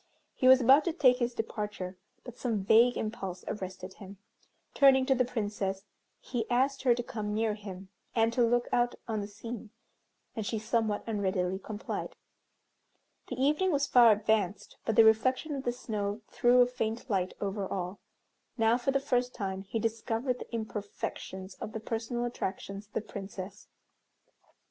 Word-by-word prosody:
He 255 - +1
was 260 0 +9
about 270 +5 +7
to 340 - 0
take 255 -7 +5
his 240 -1 -1
departure, 210 -4 -4 0.3
but 245 -2 -9
some 225 -6 -1
vague 230 +5 +5
impulse 195 -5 -4
arrested 185 -2 -5
him. 195 0 -11 0.6
Turning 265 -2 +6
to 265 - +4
the 255 -1 +2
Princess, 205 -5 -3 0.3
he 235 -3 -4
asked 265 +3 +2
her 245 -3 +4
to 240 - -3
come 210 -3 -4
near 220 0 +1
him, 195 -2 -9 0.3
and 225 0 +3
to 245 - +1
look 240 +1 +2
out 240 0 +2
on 220 -2 -1
the 200 - -5
scene, 225 +2 -8 0.7
and 220 - -2
she 220 +2 -2
somewhat 220 -1 0
unreadily 190 -4 -1
complied. 210 +1 -5 1.1
The 255 - -5
evening 300 +8 +2
was 285 -2 +2
far 240 -4 +7
advanced, 210 -2 0
but 220 - 0
the 225 - +8
reflection 255 +7 +3
of 275 -1 -4
the 240 - +2
snow 215 -3 -3
threw 245 +1 +5
a - - +7
faint 240 -1 -3
light 190 -5 -1
over 200 -1 -2
all. 185 +1 -3 0.6
Now, 225 +1 +3
for 250 - -1
the 275 0 +3
first 250 -3 0
time, 190 -3 -3
he 195 +3 -4
discovered 230 +3 -1
the - - -9
imperfections 205 -3 -5
of 215 - -5
the 220 - -3
personal 230 +2 -3
attractions 200 -3 -4
of 215 - -41
the - - -1
Princess. 195 -1 -8
225 Hz, 170 wpm, -30 LUFS, 200-245 Hz, 1.1 s, was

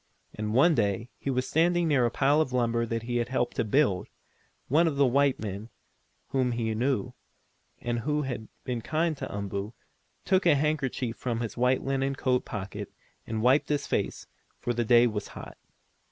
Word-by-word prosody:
And 105 0 -3
one 160 +7 +6
day, 105 -5 +1
as 115 - -12
he - - -4
was 130 -1 0
standing 175 +1 +2
near 130 -6 +3
a - - 0
pile 145 +5 +3
of 130 - -1
lumber, 115 -2 +1
that 115 0 -2
he 120 +1 -2
had 120 0 -1
helped 130 -2 -1
to - - +2
build, 110 -5 +2 0.6
one 160 +6 +4
of 155 - 0
the 140 0 +4
white 140 +1 +2
men, 105 +1 -5 0.6
whom 130 -2 +1
he 115 -1 -1
knew, 125 +2 -1 0.6
and 120 0 -2
who 150 +4 0
had 125 -5 -5 0.2
been 125 -2 -3
kind 160 +5 0
to - - -5
Umboo, 100 +1 -4 0.5
took 190 -1 +3
a 155 - +6
handkerchief 135 -5 -1
from 120 -2 -2
his 115 - -4
white, 125 +1 +2
linen 135 0 0
coat 125 -1 0
pocket, 100 -1 -6 0.4
and 110 -1 -2
wiped 130 +4 +4
his 145 -1 0
face, - - -2 0.3
for 120 - -2
the 120 0 0
day 120 +1 +6
was 105 -3 -2
hot. - - -10
125 Hz, 190 wpm, -28 LUFS, 115-140 Hz, 0.6 s, one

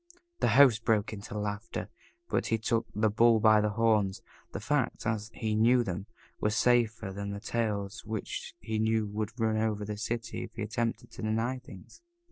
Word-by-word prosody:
The - - +2
host 125 -6 +7
broke 110 -1 +1
into 105 0 -7
laughter, 105 +1 -4 0.4
but - - 0
he 115 - +1
took 115 +1 0
the 110 0 +2
bull 115 +1 +5
by 110 0 +6
the 105 - +1
horns 105 -3 +1 0.3
the - - -4
facts, - - -1
as 110 -1 -1
he 110 -1 -2
knew 120 +3 +4
them, 95 0 -4 0.3
were 105 - +1
safer 115 -1 +2
than 100 +1 -4
the 100 0 -4
tales 105 -2 -2
which 110 -1 -5
he 110 0 -3
knew 110 0 +2
would 105 +3 -4
run 110 -1 +1
over 110 -1 0
the 105 0 -4
city 115 +2 -3
if - - -16
he 115 - -3
attempted 115 +1 -2
to - - -9
deny 115 +4 -1
things. 100 - -14
110 Hz, 185 wpm, -30 LUFS, 105-115 Hz, 0.4 s, host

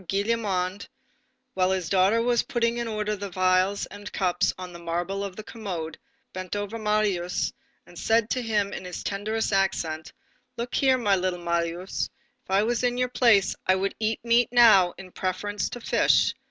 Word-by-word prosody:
Gillenormand, 200 -2 -1 0.7
while 185 -1 +2
his 190 -3 -1
daughter 195 +5 +3
was 240 0 +3
putting 235 -1 -1
in 235 - -2
order 210 -1 -2
the 200 -1 -6
phials 185 +2 +2
and 205 0 -10
cups 180 -2 +1
on 180 -1 -8
the 170 - -9
marble 175 +4 -2
of 195 -2 -5
the 215 - -7
commode, 180 -9 -5 0.4
bent 185 +1 -5
over 205 +2 -4
Marius 210 -5 0 0.3
and - - -12
said 225 -1 +2
to 255 - 0
him 210 -4 0
in - - -6
his 180 -1 -6
tenderest 215 +2 -2
accents: 165 -5 0 0.5
"Look 240 +1 -4
here, 265 -2 +3
my 205 -5 +2
little 185 -1 -1
Marius, 170 +2 -2 0.3
if - - -36
I 195 +2 +3
were 235 +2 +1
in 245 -1 0
your 250 0 +1
place, 230 -6 +4
I 185 - +5
would 195 +1 -1
eat 220 0 0
meat 235 0 +4
now 215 -7 +6
in 185 -1 -11
preference 195 +3 -2
to 245 - -7
fish. - - +3
200 Hz, 180 wpm, -26 LUFS, 185-225 Hz, 0.7 s, now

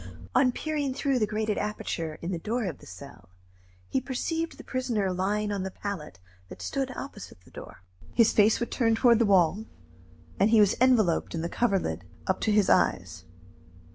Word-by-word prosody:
On 255 -2 +4
peering 290 -1 -2
through 275 -2 0
the 215 - +1
grated 215 0 -1
aperture 165 -6 -4
in 170 - -3
the 175 - -3
door 225 +6 -2
of 170 -7 -5
the - - -15
cell, 90 0 -12 0.6
he 265 - -1
perceived 325 +6 -3
the - - -10
prisoner 235 -7 -1
lying 205 +3 -1
on 200 -2 -2
the 190 - -3
pallet 185 - -6 0.3
that - - -10
stood 270 -1 -2
opposite 205 - -9
the - - -21
door. - - -11 0.3
His 230 -2 +4
face 215 +1 +4
was 235 - -2
turned 225 -2 +1
toward 235 -1 +5
the 230 - +3
wall, 185 +1 +3 0.8
and 200 - +4
he 225 -1 +5
was 205 -2 +4
enveloped 220 -12 +3
in 165 - -3
the 170 - -2
coverlid 195 - 0 0.2
up 190 - -1
to 220 - +1
his 210 -2 +3
eyes. 90 -1 +1
210 Hz, 185 wpm, -27 LUFS, 180-240 Hz, 0.8 s, toward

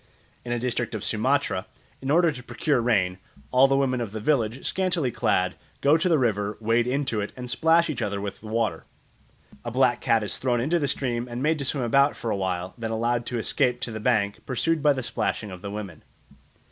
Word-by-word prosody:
In 120 - -5
a 120 - +1
district 125 0 -2
of - - -4
Sumatra, - - 0 0.3
in 135 - -4
order 165 +2 +4
to 130 -4 -8
procure 125 +2 0
rain, 95 -6 +1 0.3
all 130 +2 +6
the 135 0 +2
women 130 -2 +1
of 110 -3 -4
the 110 - -3
village, 120 -1 0
scantily 180 -8 0
clad, 95 -4 +1 0.3
go 145 +2 +4
to 170 +3 +2
the 165 - +4
river, 105 -5 0
wade 115 +2 +2
into 130 -4 0
it, 100 - -4
and 125 0 -6
splash 165 +6 +3
each 155 -6 -3
other 100 -2 -1
with 100 -1 -6
the 110 - -10
water. 110 -6 -1 0.8
A 120 - -3
black 125 0 +2
cat 115 -2 +2
is 105 - -2
thrown 125 -2 +1
into 155 +8 +1
the 145 - 0
stream 120 -3 -1
and 120 +1 -4
made 155 +1 +2
to 140 - -2
swim 130 -1 0
about 140 +5 +3
for 115 - -3
a - - +1
while, 95 -1 -2
then 115 -1 -3
allowed 115 +1 0
to 125 - -2
escape 125 +2 0
to 120 - -2
the 110 - -5
bank, 105 -3 +1
pursued 155 +5 0
by 145 0 +5
the 130 -2 -4
splashing 110 -2 -2
of 90 -1 -9
the 100 - -5
women. 100 -6 -7
120 Hz, 225 wpm, -25 LUFS, 110-135 Hz, 0.8 s, all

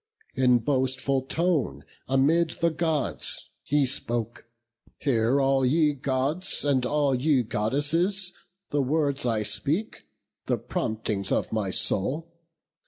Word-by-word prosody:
In 125 -1 +4
boastful 130 +2 0
tone 170 -4 0 0.2
amid 155 +5 +2
the 170 0 +2
Gods 160 -2 -2
he 145 -1 +2
spoke: 120 -3 -3 0.5
'Hear 125 -1 +2
all 135 -1 +2
ye 150 +3 +3
Gods, 140 +6 -1
and 130 -3 +2
all 145 -1 +2
ye 130 0 +2
Goddesses, 165 - 0 0.4
The 145 - +2
words 140 -1 0
I 110 -2 +1
speak, 160 - -1 0.4
the - - +1
promptings 110 -2 -3
of - - 0
my 105 -3 0
soul. 115 - 0
135 Hz, 115 wpm, -26 LUFS, 125-155 Hz, 0.5 s, In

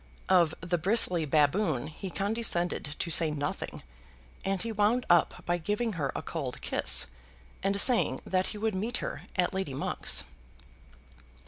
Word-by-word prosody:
Of 175 -4 +4
the 175 0 -1
bristly 180 -3 +3
baboon 150 - +2
he 175 +5 -7
condescended 180 -7 -1
to 170 - -2
say 160 0 +6
nothing, 145 -1 -4 0.6
and 195 0 -1
he 230 +3 -4
wound 215 +4 +1
up 175 -1 +3
by 175 0 0
giving 210 +6 -1
her 145 -7 -2
a - - -4
cold 140 -7 -5
kiss, - - +2 0.6
and 195 +1 +1
saying 245 +2 +3
that 185 0 0
he - - -6
would 220 +1 -1
meet 220 +6 -2
her - - -5
at 180 +1 +1
Lady 190 -8 -3
Monk's. - - +1
185 Hz, 150 wpm, -29 LUFS, 160-210 Hz, 0.6 s, say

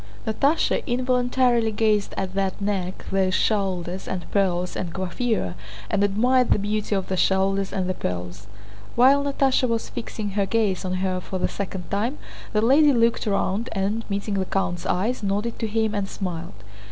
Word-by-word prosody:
Natásha 280 +9 +1
involuntarily 245 -2 +2
gazed 215 -1 +1
at 190 -1 -2
that 195 -1 -1
neck, 195 -2 -2
those 190 -1 +2
shoulders, 190 -3 0
and 180 -2 -3
pearls 180 -3 +1
and 175 - -3
coiffure, 190 - -1 0.4
and 200 - +2
admired 245 +5 +3
the - - +4
beauty 210 +1 -1
of 190 -1 -1
the 190 - -1
shoulders 195 +1 +1
and 185 -2 -1
the 185 - 0
pearls. 90 - -5 0.5
While 270 +4 +5
Natásha 270 -2 +2
was 230 -1 -1
fixing 215 -3 -5
her 200 0 0
gaze 210 -5 +1
on 185 -1 -2
her 185 -1 -1
for 190 - -4
the 180 - 0
second 190 -3 -5
time 225 +8 0 0.3
the 215 0 +1
lady 285 +5 +6
looked 230 -1 +2
round 200 +2 0
and, 205 +3 -1
meeting 200 +1 -2
the 190 -1 0
count's 180 -2 -2
eyes, 220 +8 0
nodded 205 +3 -1
to 225 - -1
him 220 0 0
and 200 -2 -2
smiled. 175 - -5
200 Hz, 170 wpm, -24 LUFS, 190-230 Hz, 0.5 s, lady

